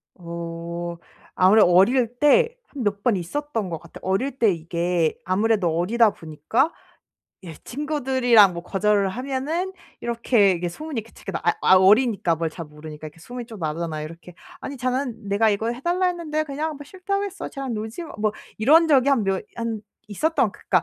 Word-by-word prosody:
어 170 0 -6 0.4
아무래도 190 +1 +6
어릴 235 +7 +5
때 460 +12 +5 0.2
한 275 -4 -6
몇 200 -1 -1
번 235 0 +2
있었던 225 - -3
것 165 -2 -4
같아요. 170 - -14
어릴 245 +9 -1
때 225 -5 +4
이게 170 0 -1
아무래도 185 -2 +1
어리다 220 +4 +3
보니까 165 - -1 0.7
예 170 - -7
친구들이랑 255 - +2
뭐 170 - -6
거절을 200 +1 +1
하면은 275 - -3 0.3
이렇게 235 -4 +2
이게 175 0 -2
소문이 295 - -5
그 230 - -19
치 - - -17
아 - - +1
아 185 - +6
어리니까 200 -2 +4
뭘 165 0 -1
잘 165 +1 -7
모르니까 150 0 -10
이렇게 155 +2 -13
소문이 245 +6 -8
좀 225 -3 -10
나잖아요 155 -1 -3
이렇게. 170 +2 -12 0.3
"아니 280 - -6
쟤는 250 -4 -2
내가 210 +2 +3
이걸 220 +3 -1
해달라 350 +8 0
했는데 325 -4 -1
그냥 305 +2 -3
뭐 290 - -10
싫다고 385 +5 -3
했어. 395 0 -6
쟤랑 270 -4 -4
놀지마." 220 +10 -6
뭐 215 0 +1 0.3
이런 315 +9 +5
적이 275 -3 +4
한 265 -5 +3
몇 195 -1 -1
한 230 -2 -3 0.3
있었던 250 - +1
그러니까 185 -4 0
220 Hz, 355 characters per minute, -23 LUFS, 175-270 Hz, 0.7 s, 아무래도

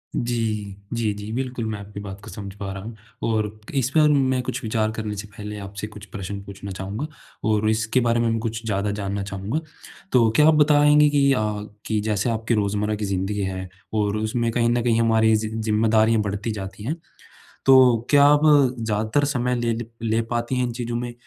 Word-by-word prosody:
जी, 110 -4 -2 0.2
जी, 115 -3 0
जी, 105 +1 -7
बिल्कुल 125 -1 -3
मैं 105 -2 -4
आपकी 100 0 -9
बात 100 -1 -8
को 110 - -9
समझ 100 -3 -7
पा 100 -2 -4
रहा 95 0 -7
हूँ। 115 +1 -8 0.3
और 110 -2 -1 0.2
इस 130 -2 +1
पर 155 -1 +6
मैं 130 -3 +2
कुछ - - -3
विचार 110 -1 0
करने 110 -1 -4
से 105 +1 -6
पहले, 105 +1 -8
आपसे 100 +1 -6
कुछ 105 -1 -11
प्रश्न 100 0 -6
पूछना 100 0 -8
चाहूँगा। 100 +9 -4 0.4
और 110 0 +2
इसके 110 +3 +1
बारे 120 -1 +2
में 115 -1 +1
कुछ 115 0 -4
ज़्यादा 100 -1 0
जानना 100 -1 -3
चाहूँगा। 100 +8 -3 0.5
तो 120 -3 +5
क्या 150 +3 +6
आप 160 - +6
बताएँगे 150 0 +5
कि 140 -1 +3
अ, 130 - +1 0.5
कि 110 -1 0
जैसे 105 +1 0
आपकी 115 +1 -1
रोज़मर्रा 105 0 0
की 105 0 -3
ज़िंदगी 95 +1 -2
है 95 -1 -4 0.2
और 105 -1 +1
उसमें 115 +2 -1
कहीं 115 0 +2
न 120 0 +2
कहीं 115 -1 +2
हमारी 110 -1 +4
ज़ि 110 0 -1
ज़िम्मेदारियाँ 110 0 +2
बढ़ती 105 +2 -3
जाती 100 -1 -7
हैं। 140 +8 -2 0.7
तो 125 -3 +6
क्या 145 -1 +7
आप 145 0 +6 0.4
ज़्यादातर 110 +5 0
समय 125 -3 0
ले 120 -1 0
ले 120 +1 -4 0.2
ले 110 0 +1
पाती 120 +2 -1
हैं 125 - +1
इन 120 - -4
चीज़ों 120 0 -3
में 120 0 -3
110 Hz, 200 wpm, -23 LUFS, 105-120 Hz, 0.7 s, क्या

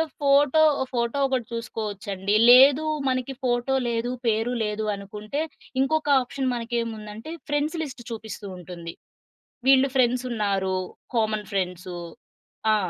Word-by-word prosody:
ఆహ్, 320 -1 -1
photo 285 +2 +4 0.3
photo 235 +2 -1
ఒకటి 260 -3 -1
చూసుకోవచ్చు 220 -4 -5
అండి. 195 +2 -1 0.2
లేదు 270 +4 +8 0.2
మనకి 255 0 -1
ఫోటో 245 +1 +1
లేదు, 235 +1 -1 0.2
పేరు 225 +2 +1
లేదు 210 +1 -2
అనుకుంటే, 210 +7 -5 0.4
ఇంకొక 295 +2 +1
ఆప్షన్ 260 +1 -3
మనకేముందంటే 230 0 -4 0.2
ఫ్రెండ్స్ 290 +3 0
లిస్ట్ 260 -5 -7
చూపిస్తూ 220 -2 -7
ఉంటుంది. 170 -1 -8 0.8
వీళ్ళు 270 0 +6
ఫ్రెండ్స్ 250 0 +3
ఉన్నారు. 195 -4 0 0.4
Common 215 -2 0
friends. 180 -1 -3 0.8
ఆ! - - +5
235 Hz, 120 wpm, -25 LUFS, 210-265 Hz, 0.8 s, లేదు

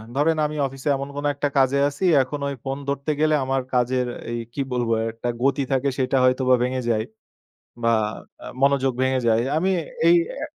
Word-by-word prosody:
ধরেন 155 +3 +2
আমি 150 +1 -3
অফিসে 135 +2 -5
এমন 140 +1 -5
কোনো 145 0 -2
একটা 145 0 -1
কাজে 135 +1 +3
আছি 185 +6 -4 0.2
এখন 145 +3 -6
ওই 140 - -3
ফোন 135 +1 -3
ধরতে 140 +2 -1
গেলে 155 0 +3
আমার 135 0 0
কাজের 125 0 +1 0.3
এই 120 - -2
কি 140 - -3
বলবো 120 -2 0
একটা, 115 +2 -5 0.2
গতি 140 +1 +2
থাকে 135 +1 +1
সেইটা 130 0 +1
হয়তোবা 130 0 +4
ভেঙে 130 0 -1
যায় 110 -1 +1 0.8
বা 115 - +3 0.5
অ্যা - - -10
মনোযোগ 135 -1 +3
ভেঙে 130 0 +2
যায়। 115 0 +3 0.2
আমি 185 +4 +1 0.4
এই 175 - +7
অ্যা 315 - -5
135 Hz, 185 wpm, -23 LUFS, 125-140 Hz, 0.8 s, এই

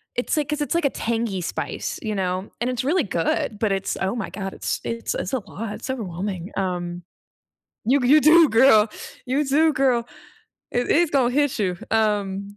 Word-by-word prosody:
it's 245 - -1
like 295 -1 0
'cause 300 0 -2
it's 295 - -1
like 340 - +1
a - - +4
tangy 225 -6 -2
spice, - - -4
you 215 -2 -3
know, 185 +1 -2
and 245 - 0
it's 250 -1 -2
really 315 +5 +2
good, 195 +4 -1
but 220 -3 +1
it's, 195 0 -1
oh, 190 +5 0
my 220 - -4
god, 195 -1 -5
it's - - -3
it's 230 0 -3
it's 185 - -3
a 260 - +1
lot, 210 +1 -7
it's - - -8
overwhelming, 190 -5 -4
um 175 -2 -3 0.8
You 275 +4 +4
d 245 - +1
you 300 +3 +7
do, 320 0 +7
girl. 225 -2 +5 0.4
You 275 +4 +1
do, 310 +4 +3
girl. 255 -4 +1 0.6
It 245 0 -1
it's 340 0 +3
gonna 255 -3 +2
hit 290 -3 +1
you, 185 -4 0
um, 205 -2 0
230 Hz, 195 wpm, -23 LUFS, 195-270 Hz, 0.8 s, you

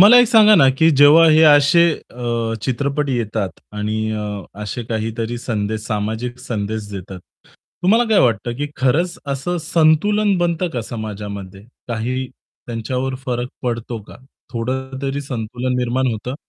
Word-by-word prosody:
मला 220 +6 +9
एक 245 - +4
सांगा 215 -2 +7
ना 135 -8 +6
की 160 0 +5
जेव्हा 145 +3 +7
हे 155 +1 +5
असे 145 +2 +6 0.3
अ, 115 -2 -2
चित्रपट 140 +3 -1
येतात 110 -5 -3
आणि 110 +1 -2
अ, 105 -2 -4 0.2
असे 105 +4 -4
काहीतरी 115 +1 -3
संदेश, 110 -2 -3
सामाजिक 110 +3 -3
संदेश 110 -3 -4
देतात. 95 -1 -7 0.6
तुम्हाला 225 +6 +4
काय 215 -3 +4
वाटतं 120 -1 +1
की 145 - -2
खरंच 160 +8 +1
असं 140 +6 -2
संतुलन 175 +6 +2
बनतं 175 0 0
का 125 - -3
समाजामध्ये? 100 -4 -7 0.3
काही 125 +3 -2 0.4
त्यांच्यावर 125 +3 -3
फरक 120 0 -2
पडतो 120 -1 -3
का? - - -14 0.4
थोडं 130 +3 -3
तरी 140 +1 -2
संतुलन 125 -1 -3
निर्माण 125 +1 0
होतं? 125 +4 -5
125 Hz, 140 wpm, -19 LUFS, 110-145 Hz, 0.6 s, मला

